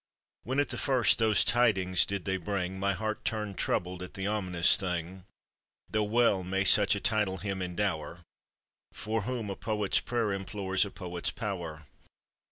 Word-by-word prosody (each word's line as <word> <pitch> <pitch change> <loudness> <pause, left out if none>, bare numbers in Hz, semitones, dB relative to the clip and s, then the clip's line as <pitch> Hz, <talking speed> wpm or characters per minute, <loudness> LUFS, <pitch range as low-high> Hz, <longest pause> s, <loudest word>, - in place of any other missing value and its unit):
When 130 +4 -2
at 145 - +1
the - - -3
first 130 -5 +3
those 110 -2 +4
tidings 95 -7 +3
did 100 -2 -3
they 95 -1 0
bring, 95 0 -3
My 100 +1 +1
heart 110 +2 -3
turned 105 -3 -3
troubled 90 0 -1
at 90 - -8
the 95 - -4
ominous 95 -5 +3
thing: 90 0 -4 0.7
Though 110 -1 +1
well 105 -3 +2
may 95 +2 -1
such 100 +1 +5
a - - -3
title 105 -3 0
him 95 0 -4
endower, 90 -2 -3 0.7
For 110 +1 -2
whom 115 -2 -3
a - - -4
poet's 105 0 0
prayer 115 -4 -1
implores 95 0 0
a - - -6
poet's 90 -3 -4
power. 85 -8 -5
100 Hz, 165 wpm, -29 LUFS, 90-110 Hz, 0.7 s, such